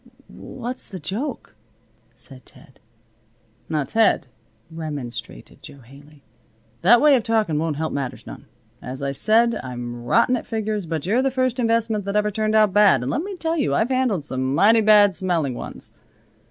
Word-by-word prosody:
"What's 250 0 -8
the 190 - -7
joke?" 230 - -5 0.6
asked 125 +2 -14
Ted. 130 - -17 0.9
"Now, 155 -2 0
Ted," 220 0 +2 0.5
remonstrated 145 - -7
Jo 140 - -13
Haley, 140 +4 -18 0.6
"that 235 +7 +6
way 295 +1 +5
of 250 - +1
talkin' 215 -9 0
won't 160 -1 -2
help 160 +2 -3
matters 140 -3 -5
none. - - -11 0.3
As 130 +2 -7
I 140 - -1
said, 225 - +2
I'm 120 -1 -7
rotten 185 - +2
at 245 - -6
figures. 215 -4 -3
But 160 -2 -4
you're 220 +7 +2
the 270 - +1
first 255 -1 -1
investment 225 -3 0
that 200 +1 -3
ever 210 0 +1
turned 215 +1 -1
out 215 -3 +4
bad, 200 - +4
and 125 - -2
let 290 - -1
me 390 +2 -6
tell 330 -1 -2
you 285 - 0
I've 225 - +1
handled 250 - 0
some 130 0 -2
mighty 220 +7 +5
bad 205 -3 +5
smelling 165 -6 0
ones. - - -9
200 Hz, 170 wpm, -22 LUFS, 140-230 Hz, 0.9 s, that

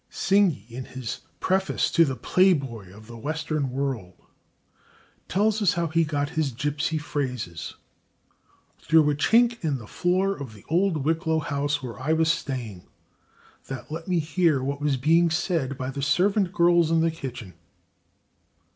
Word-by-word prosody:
Synge, 195 - +2
in 125 +2 -7
his 130 -3 -6 0.2
preface 190 +1 0
to 165 - +5
"The 135 -3 -2
Playboy 135 - +1
of 105 +3 -14
the 115 +1 -11
Western 155 +1 -2
World," 125 -8 -3 1.1
tells 215 +3 +1
us 195 -4 +3
how 170 -2 -1
he 165 +1 +2
got 145 -2 -1
his 155 -4 0
gypsy 150 +5 -1
phrases 125 - -4 1.0
"through 155 -2 +4
a - - -1
chink 235 +8 +3
in 150 -4 0
the 115 - -10
floor 185 - 0
of 130 - -8
the 100 - -16
old 170 -3 +1
Wicklow 160 0 +1
house 145 -2 -1
where 120 -2 -7
I 155 +5 +1
was 160 0 +3
staying, 120 - -5 0.8
that 135 +2 -7
let 165 +2 -6
me 180 -2 +1
hear 160 -3 +1
what 140 +1 -3
was 145 -2 +1
being 165 +6 +3
said 160 -5 -1
by 130 0 -3
the 140 - -5
servant 190 +6 +2
girls 170 -2 +4
in 165 0 +3
the 165 0 +2
kitchen." 125 - -7
150 Hz, 155 wpm, -25 LUFS, 130-170 Hz, 1.1 s, to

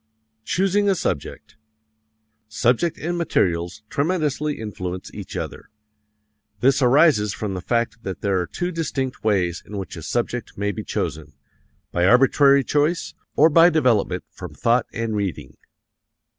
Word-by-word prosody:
Choosing 195 - +1
a 195 - +3
Subject 105 - -4 0.9
Subject 120 +9 +1
and 175 +2 -3
materials 90 - 0
tremendously 150 - -1
influence 95 -4 -6
each - - -7
other. - - -6 0.9
"This 135 +5 +3
arises 125 -5 +4
from 105 -3 -4
the 90 - -4
fact 115 +2 -1
that 95 -7 -6
there 100 -2 +1
are 90 - -2
two 175 - -3
distinct 140 -6 -3
ways 95 -5 +1
in 105 - -8
which 95 - -6
a 85 - -8
subject 120 +7 -3
may 105 +1 -1
be 95 - -6
chosen: 75 -1 -4 0.6
by 85 0 +1
arbitrary 135 +4 +5
choice, 150 +6 0 0.2
or 155 - +6
by 165 +2 +6
development 125 - +1
from - - -9
thought 120 +1 +2
and 115 -1 -3
reading. 90 -10 -4
120 Hz, 140 wpm, -22 LUFS, 95-150 Hz, 0.9 s, or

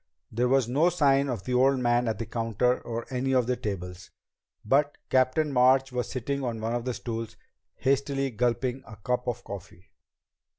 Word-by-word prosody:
There 120 +3 +1
was 130 -2 +3
no 145 +8 +3
sign 140 -5 +3
of 115 -7 -3
the 125 - -3
old 135 +2 +4
man 120 -1 +2
at 110 - -1
the 115 - -4
counter 115 +2 0
or 115 0 -5
any 130 +1 0
of 125 -2 +3
the 125 +1 0
tables, 90 -6 -6 0.6
but 145 +5 +2
Captain 130 +3 +2
March 130 +1 +4
was 125 -1 -2
sitting 135 +2 -3
on 120 -3 -3
one 110 +1 -2
of 120 0 -2
the 125 -2 -2
stools, 115 -1 -5 0.4
hastily 135 0 0
gulping 120 +3 -1
a 110 - -10
cup 125 +4 -2
of 120 0 -3
coffee. 95 -2 -10
125 Hz, 180 wpm, -27 LUFS, 115-135 Hz, 0.6 s, old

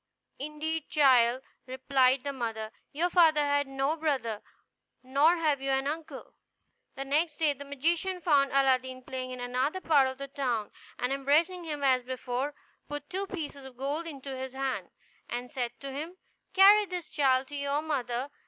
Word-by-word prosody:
"Indeed, 305 +2 -4
child," 255 -4 +4 0.2
replied 260 0 +2
the 280 - -3
mother, 225 -4 -4 0.2
"your 345 +5 0
father 320 -4 +5
had 285 0 +1
no 270 +3 0
brother, 265 -9 -1 0.6
nor 285 +7 +4
have 300 -4 +1
you 270 - -2
an 270 0 +1
uncle." 310 +2 -5 0.6
The 275 - -5
next 300 +3 +1
day 310 -3 +2
the 285 +1 -10
magician 330 +7 -1
found 290 -5 +3
Aladdin 260 -1 +2
playing 255 0 -5
in 255 0 -7
another 250 +8 -1
part 290 -7 +4
of 260 0 -5
the 275 0 -6
town, 250 -6 -2 0.3
and 250 +2 0
embracing 320 +6 +1
him 295 -3 -4
as 260 -2 +4
before, 255 +2 -3 0.3
put 290 0 -6
two 390 +2 -2
pieces 300 -7 -6
of 265 -2 -12
gold 290 +5 -2
into 275 -3 -7
his 260 0 -6
hand, 265 0 -3 0.4
and 245 +1 -4
said 245 -4 -4
to 275 -1 -6
him, 315 +7 -6 0.3
"Carry 405 +2 +7
this, 360 -2 -5
child, 265 -2 +2
to 290 - -7
your 280 +1 -1
mother. 260 -3 -2
275 Hz, 170 wpm, -29 LUFS, 260-310 Hz, 0.6 s, Carry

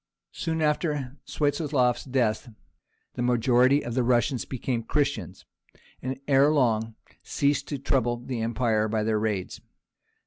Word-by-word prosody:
Soon 160 -2 -2
after 150 -3 -1
Swiatoslaf's 145 -4 0
death 125 -3 0 0.6
the - - -4
majority 125 +3 +3
of 120 - -4
the 130 - +1
Russians 120 +1 +1
became 125 -2 -3
Christians, 140 - -2 0.6
and 130 +1 -4
ere 140 0 +5
long 115 -6 +1 0.3
ceased 140 -1 0
to 145 - -3
trouble 125 -3 0
the 120 -1 -5
empire 115 -1 +1
by 110 0 -1
their 110 0 +1
raids. 105 -4 -3
125 Hz, 130 wpm, -26 LUFS, 115-140 Hz, 0.6 s, ere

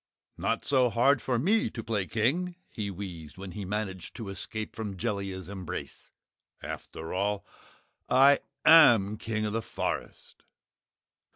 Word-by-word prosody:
"Not - - -1
so 130 -3 +3
hard 120 +4 +3
for 125 -2 0
ME 205 - +2
to 115 - -7
play 105 -4 -1
King," 165 +11 0 0.2
he 105 -3 -3
wheezed 90 -6 -8
when 95 0 -7
he 100 +1 -6
managed 95 -2 -4
to 110 -4 -6
escape 110 +3 -4
from 105 -3 -5
Jellia's 100 -4 -3
embrace. 95 -4 -7 0.5
"After 80 0 -7
all 100 +2 -1 0.6
I 135 +2 +6 0.3
AM 115 -11 +7
King 110 -1 -2
of 105 - -2
the 115 - 0
Forest!" - - -5
105 Hz, 135 wpm, -29 LUFS, 95-120 Hz, 0.6 s, AM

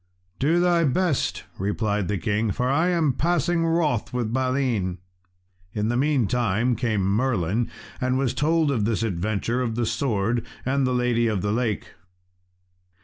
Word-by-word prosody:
"Do 160 +6 +3
thy 175 -1 +3
best," 155 +1 0 0.2
replied 105 0 -1
the 105 - -1
king, 105 +5 0
"for 125 +6 -1
I 150 +6 +2
am 165 -6 +2
passing 170 +2 +1
wroth 160 -8 +1
with 120 -3 -2
Balin." 130 -8 0 0.8
In 105 +1 0
the 120 - 0
meantime 125 -4 +1
came 110 -5 0
Merlin, 110 0 0 0.3
and 130 0 +1
was 135 -3 0
told 155 0 +2
of 115 -7 0
this 115 0 0
adventure 110 +4 -1
of 115 -3 -2
the 120 0 0
sword 115 -2 0 0.2
and 135 0 +1
lady 125 -2 +1
of 105 -4 -1
the 105 - 0
lake. 115 -2 -1
120 Hz, 145 wpm, -24 LUFS, 105-140 Hz, 0.8 s, Do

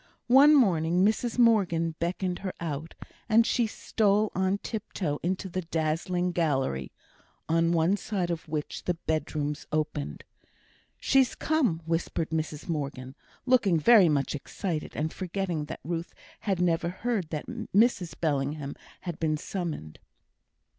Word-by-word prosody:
One 290 +3 +8
morning 180 - +3
Mrs 225 +3 0
Morgan 185 -9 +3
beckoned 180 +1 -2
her 190 -2 -4
out; 160 -1 -5 0.3
and 225 +1 +5
she 235 -1 +2
stole 210 -1 +1
on 190 +2 +1
tiptoe 200 -9 -4
into 185 +3 -2
the 185 0 -3
dazzling 165 +2 -1
gallery, 135 - 0 0.6
on 165 +1 +2
one 170 +4 +3
side 190 -5 -2
of 170 0 -4
which 150 -1 -4
the 180 - 0
bedrooms 155 -2 -2
opened. 150 - -2 0.8
"She's 265 -2 +3
come," 250 - +1
whispered 165 -1 -1
Mrs 155 -1 -3
Morgan, 140 -5 -4 0.3
looking 220 -10 +4
very 200 0 +7
much 140 -2 0
excited, 155 +3 -4
and 155 +1 -2
forgetting 180 -4 -3
that - - -8
Ruth 170 +1 -4 0.2
had 195 -5 -1
never 170 -1 +1
heard 195 -2 -2
that 155 -3 -4
Mrs 225 -5 +1
Bellingham 145 -2 -1 0.3
had 175 -3 -5
been 155 -2 +1
summoned. 155 - -5
170 Hz, 135 wpm, -28 LUFS, 155-200 Hz, 0.8 s, One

